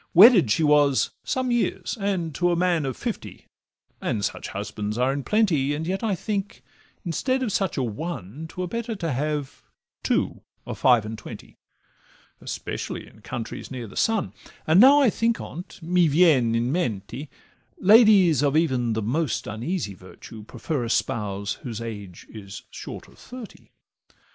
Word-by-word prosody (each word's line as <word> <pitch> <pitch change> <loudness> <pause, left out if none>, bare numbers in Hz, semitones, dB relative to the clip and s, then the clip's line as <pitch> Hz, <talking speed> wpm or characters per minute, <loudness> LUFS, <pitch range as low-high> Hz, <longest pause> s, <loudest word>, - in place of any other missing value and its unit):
Wedded 190 - +8
she 160 - +2
was 145 -2 +4
some 260 -1 -1
years, 240 -1 -1
and 185 -5 -1
to 175 +5 +1
a - - +2
man 170 -4 +1
Of 130 - -4
fifty, - - -6 0.6
and 100 -3 -1
such - - -4
husbands 105 +1 -4
are 130 +2 +2
in 140 - -3
plenty; 160 -10 +2
And 155 +2 -4
yet, 190 +5 -2
I 215 -4 +1
think, 200 +1 -4 0.4
instead 260 - 0
of 230 - -1
such 195 -2 -1
a 135 - +1
ONE 135 - -5
'Twere 180 +3 -5
better 230 +4 -4
to 170 -6 -3
have 145 +1 -3 0.4
TWO - - 0 0.2
of - - -6
five 120 -4 +4
and 110 0 -6
twenty, - - -11 0.8
Especially - - -5
in - - -18
countries 115 -2 -6
near 125 -3 -6
the 100 - -12
sun: 220 - 0 0.3
And 160 +4 +5
now 275 +5 +8
I 255 -6 +4
think 230 +2 0
on 175 +4 -7
't, - - -16
'mi 175 0 +3
vien 145 -7 +4
in 120 +2 0
mente,' 125 - -3 0.5
Ladies 200 - +6
even 140 -4 +2
of 115 - 0
the 110 - -1
most 140 +5 -1
uneasy 115 - -3
virtue 95 +4 -12
Prefer 120 +5 -4
a 115 - -3
spouse 100 -3 -1
whose 115 -3 -5
age 105 -6 -8
is 100 -3 -9
short - - -8
of - - -20
thirty. 250 -3 -11
150 Hz, 165 wpm, -24 LUFS, 115-185 Hz, 0.8 s, Wedded